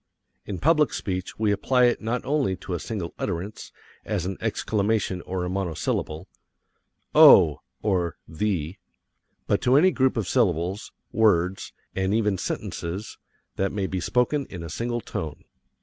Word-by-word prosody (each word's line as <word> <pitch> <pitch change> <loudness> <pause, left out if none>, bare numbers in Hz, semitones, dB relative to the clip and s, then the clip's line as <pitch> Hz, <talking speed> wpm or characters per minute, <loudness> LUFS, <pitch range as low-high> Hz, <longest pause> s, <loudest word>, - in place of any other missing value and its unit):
In 100 - -4
public 150 - +3
speech 95 -1 -4
we 110 -1 +2
apply 125 +5 +2
it 120 - +2
not 115 +3 -2
only 135 -8 +1
to 90 - -7
a 85 - -2
single 95 -5 -5
utterance, 95 +3 -4 0.3
as 100 -5 -2
an 95 +1 -3
exclamation 100 -3 0
or 90 -1 -2
a - - -2
monosyllable 85 -4 -2 0.9
(Oh! 75 -4 +8 0.2
or 90 -5 0
the) 85 -1 -2 0.7
but - - +1
to 125 +1 +3
any 185 +5 +5
group 130 -5 +1
of 105 -5 -1
syllables, 95 -4 0 0.2
words, 95 -4 +2 0.2
and 95 +2 +1
even 105 -4 +1
sentences 90 +5 -4 0.4
that 95 +1 0
may 100 -2 -2
be 95 0 -2
spoken 125 - +1
in 90 -3 -8
a 80 - -7
single 120 +5 -2
tone. 75 -7 -6
100 Hz, 150 wpm, -25 LUFS, 90-115 Hz, 0.9 s, Oh